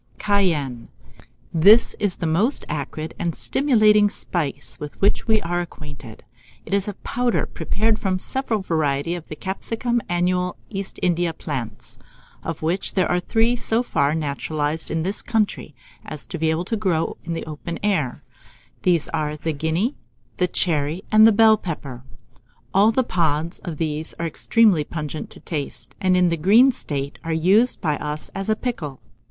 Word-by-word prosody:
] - - -34
CAYENNE. 160 - 0 0.7
This 200 +8 +6
is 205 -3 0
the - - -4
most 195 - +1
acrid 155 +2 -4
and 170 -2 -1
stimulating 215 -7 +4
spice 170 -7 -3
with 150 -1 -8
which 200 - +2
we 220 -1 +4
are 175 +1 -1
acquainted. 145 -8 -10 0.4
It - - -5
is 200 0 +1
a 205 - -4
powder 245 -1 0
prepared 220 +1 0
from 190 -2 0
several 225 0 -1
varieties 160 0 0
of 160 - -18
the 155 - -7
capsicum 225 +7 -2
annual 180 +1 0 0.2
East 195 -2 -4
India 175 -1 +1
plants, 130 -7 -6 0.4
of - - -5
which 170 +5 0
there 185 -2 +3
are 175 - +2
three 225 +6 +2
so 230 0 +1
far 145 - +1
naturalized 150 +1 -2
in 160 0 -1
this 195 +4 0
country 215 - -1 0.3
as 155 -1 -6
to 175 - -6
be 160 0 +2
able 160 +3 0
to 225 - -1
grow 185 -7 0
in 170 - -4
the 165 - -4
open 155 +2 -6
air: 180 -12 0 0.6
these 175 -4 +2
are 150 -1 -2
the 160 +1 -2
Guinea, 160 - 0 0.4
the 180 - +2
Cherry, 160 0 -1
and 215 +1 +8
the - - +6
Bell 220 0 +6
pepper. 140 -10 -6 0.7
All 205 +3 +5
the 260 +3 +2
pods 165 -4 0
of 165 -4 -6
these 155 0 -3
are 170 - -3
extremely 195 +1 +3
pungent 155 0 -5
to - - -11
the - - -27
taste, 150 -4 -5
and 185 -2 +3
in 180 -1 +4
the 170 - 0
green 220 - +6
state 140 - -5
are 165 - -3
used 195 +10 +3
by 150 -3 0
us 150 +1 -5
as 195 +2 -4
a 215 - +3
pickle. 170 - -4
175 Hz, 170 wpm, -22 LUFS, 155-210 Hz, 0.7 s, and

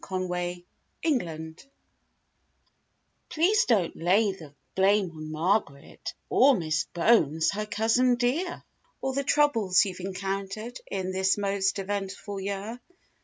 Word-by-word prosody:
73 180 -1 -3 0.4
TO 320 - +3
WOODROW 160 -1 -7 1.7
Please 370 +7 +3
don't 205 -9 +1
lay 195 +5 +3
the 160 -6 -11 0.2
blame 195 -1 +3
on 155 -1 -8
Margaret, 155 -3 -2
Or 270 -1 +5
Miss 160 -2 -1
Bones, 165 -5 +3
her 210 +1 -3
cousin 230 +4 +2
dear; 275 +10 -1 0.4
Or 265 0 -2
the 280 +1 -1
troubles 230 -11 +3
you've 185 -2 -6
encountered 195 +5 -4
In 190 -1 -2
this 190 +1 +1
most 200 -1 0
eventful 200 0 -4
year. 200 +4 -4
195 Hz, 120 wpm, -27 LUFS, 180-225 Hz, 1.7 s, Or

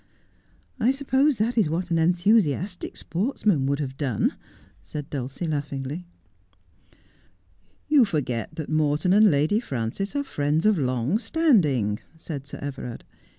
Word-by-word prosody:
I 235 - +3
suppose 270 0 +2
that 230 +3 +1
is 195 - +2
what 175 +2 -2
an 165 - +2
enthusiastic 180 0 +1
sportsman 190 - 0
would 140 0 +1
have 135 -2 -4
done,' 130 -8 0 0.5
said 145 - -7
Dulcie 135 +4 -4
laughingly. 145 +2 -4 0.9
' 90 0 -36
You 295 -3 +6
forget 125 - -2
that 155 - -5
Morton 155 +4 +2
and 210 +1 +7
Lady 155 +7 +2
Frances 140 - -4
are 285 - +1
friends 150 - 0
of 215 -5 +4
long 130 - 0
standing,' 180 - +2 0.2
said 145 -4 -7
Sir - - -7
Everard. 135 -4 -6
155 Hz, 135 wpm, -25 LUFS, 135-210 Hz, 0.9 s, and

